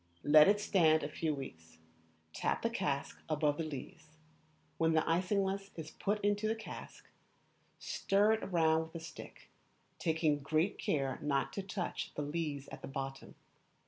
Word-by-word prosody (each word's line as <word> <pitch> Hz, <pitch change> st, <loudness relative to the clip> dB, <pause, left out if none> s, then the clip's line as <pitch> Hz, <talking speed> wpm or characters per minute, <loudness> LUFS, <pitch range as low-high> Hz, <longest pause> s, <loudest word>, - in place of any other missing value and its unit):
Let 150 Hz, +1 st, +8 dB
it 205 Hz, +1 st, +4 dB
stand 160 Hz, -6 st, +4 dB
a -, -, -1 dB
few 155 Hz, 0 st, -1 dB
weeks. 80 Hz, -, -9 dB, 0.6 s
Tap -, -, -1 dB
the 230 Hz, -, +1 dB
cask 145 Hz, -11 st, -2 dB
above 150 Hz, -1 st, +1 dB
the -, -, +1 dB
lees. 155 Hz, +1 st, -8 dB, 0.6 s
When 165 Hz, 0 st, +3 dB
the 160 Hz, -, +4 dB
isinglass 195 Hz, +3 st, +1 dB
is 160 Hz, -2 st, -7 dB
put 205 Hz, +1 st, -1 dB
into 205 Hz, +1 st, +2 dB
the 220 Hz, -, +1 dB
cask, 220 Hz, -, -9 dB, 0.7 s
stir 205 Hz, +2 st, +2 dB
it 220 Hz, -3 st, -3 dB
round 160 Hz, -2 st, +3 dB
with 160 Hz, -, -17 dB
a -, -, -3 dB
stick, -, -, -11 dB, 0.5 s
taking 160 Hz, -3 st, +1 dB
great 155 Hz, +7 st, 0 dB
care 135 Hz, -3 st, 0 dB
not 145 Hz, -2 st, 0 dB
to 195 Hz, -, -2 dB
touch 190 Hz, -2 st, -4 dB
the 150 Hz, -, -2 dB
lees 145 Hz, -2 st, -3 dB
at -, -, -9 dB
the -, -, -6 dB
bottom. 135 Hz, 0 st, -6 dB
160 Hz, 160 wpm, -34 LUFS, 145-195 Hz, 0.7 s, Let